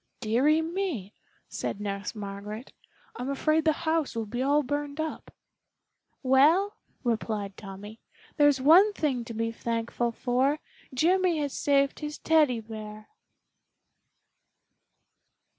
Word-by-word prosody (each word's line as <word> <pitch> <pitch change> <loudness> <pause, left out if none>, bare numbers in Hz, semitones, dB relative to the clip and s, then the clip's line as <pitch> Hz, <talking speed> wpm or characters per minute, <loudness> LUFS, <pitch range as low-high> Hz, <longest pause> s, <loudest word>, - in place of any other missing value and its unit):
"Dearie 265 +8 +3
me!" 325 - -3 0.3
said - - -4
Nurse 200 +2 -4
Margaret, 210 +3 -7 0.4
"I'm 250 +2 -4
afraid 310 +3 +1
the 315 - +5
house 320 -4 0
will 225 -1 -2
be 240 +4 -4
all 290 +3 +3
burned 290 +2 -3
up." 315 0 -4 0.9
"Well," 305 +10 +4 0.3
replied 215 -4 -2
Tommy, 205 +2 -10 0.4
"there's 290 -3 +4
one 350 +10 +6
thing 270 -9 -1
to 230 -1 -7
be 230 +1 -1
thankful 230 +1 -2
for, 260 +5 +1 0.3
Jimmy 350 +5 +2
has 290 -2 -2
saved 280 -1 +2
his 300 0 -5
Teddy 300 -8 +3
bear." 215 -1 -9
260 Hz, 115 wpm, -28 LUFS, 225-305 Hz, 0.9 s, one